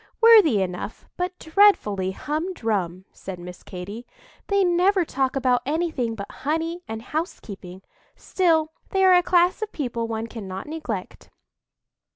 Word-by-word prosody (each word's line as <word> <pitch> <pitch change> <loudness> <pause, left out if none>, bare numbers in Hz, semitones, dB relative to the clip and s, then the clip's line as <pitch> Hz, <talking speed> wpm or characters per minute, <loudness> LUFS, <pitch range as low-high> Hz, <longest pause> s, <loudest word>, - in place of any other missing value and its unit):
"Worthy 415 - +7
enough, 180 +3 -6
but 360 +1 -3
dreadfully 320 - +3
humdrum," 225 - -2
said 190 -1 -8
Miss 180 +1 -10
Katy. 200 +6 -8 0.4
"They 400 -1 +3
never 360 +1 +3
talk 265 -3 -1
about 250 -2 +2
anything 290 -6 -1
but 200 -2 -7
honey 325 +4 -2
and 220 0 -6
housekeeping; 200 - -6 0.3
still, 325 -4 +1 0.2
they 385 -1 +2
are 370 - +7
a 355 - +6
class 355 +3 +3
of 435 -1 -3
people 235 -5 -3
one 225 0 -3
cannot 195 -5 -7
neglect." 295 -12 -6
270 Hz, 135 wpm, -24 LUFS, -, 0.4 s, Worthy